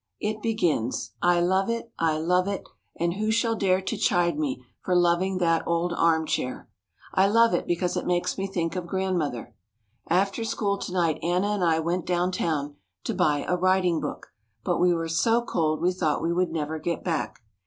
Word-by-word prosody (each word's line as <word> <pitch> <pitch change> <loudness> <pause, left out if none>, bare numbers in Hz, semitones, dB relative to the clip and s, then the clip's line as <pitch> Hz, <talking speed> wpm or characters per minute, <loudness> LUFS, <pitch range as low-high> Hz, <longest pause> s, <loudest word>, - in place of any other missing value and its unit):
It 215 0 -3
begins, 175 - 0
"I 175 0 +4
love 190 +4 +2
it, 230 0 -3
I 160 -2 +2
love 180 +4 +1
it, 200 -1 -3 0.3
and 170 0 0
who 215 +3 -2
shall 230 +1 +2
dare 190 -3 +2
to 210 - -3
chide 175 -6 +2
me 135 -4 -3 0.2
for 180 - +1
loving 175 +2 +2
that 165 -2 +2
old 170 +1 0
arm 165 -2 +2
chair?" 130 -4 -3 0.5
I 190 +1 +4
love 230 +1 +4
it 175 - 0
because 175 +1 0
it - - -2
makes 180 0 0
me 195 0 -2
think 175 -3 -2
of 180 -2 -4
Grandmother. 170 - -2 0.5
After 195 +5 +1
school 200 -3 -1
to - - -5
night 170 -4 +1
Anna 180 +4 +1
and 205 -3 0
I 165 -2 +3
went 170 +1 -2
downtown 170 -5 -1 0.3
to - - -2
buy 145 -1 +1
a 180 - +2
writing 180 -2 +2
book, 150 - -6 0.3
but 175 - 0
we 180 0 +4
were 165 -1 -1
so 225 +9 +2
cold 155 -8 0
we 180 +1 +3
thought 160 -5 0
we 170 +1 +1
would 180 0 +1
never 155 -1 -3
get 170 +2 -3
back. 160 -8 -3
175 Hz, 195 wpm, -26 LUFS, 165-190 Hz, 0.5 s, I